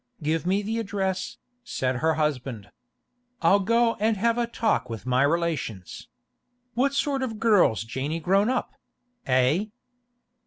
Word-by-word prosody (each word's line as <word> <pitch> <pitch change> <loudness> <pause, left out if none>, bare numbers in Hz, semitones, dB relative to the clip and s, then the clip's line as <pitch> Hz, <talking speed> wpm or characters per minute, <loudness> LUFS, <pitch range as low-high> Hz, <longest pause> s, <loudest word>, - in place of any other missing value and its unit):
'Give 160 +3 -1
me 195 +3 +1
the 225 +3 -2
address,' 190 -3 -2 0.3
said 130 - -2
her 160 +4 +1
husband. 130 -8 -2 0.7
'I'll 200 - +5
go 230 +3 +2
and 215 0 +1
have 230 +3 +2
a 240 -1 0
talk 230 - 0
with 115 0 -6
my 130 0 +2
relations. 145 - -2 0.7
What 270 +4 +1
sort 280 -1 0
of 255 -4 -2
a - - -8
girl's 205 - +3
Janey 135 +8 -3
grown 195 +6 +2
up—eh? 195 - -1
190 Hz, 140 wpm, -25 LUFS, 135-230 Hz, 0.7 s, I'll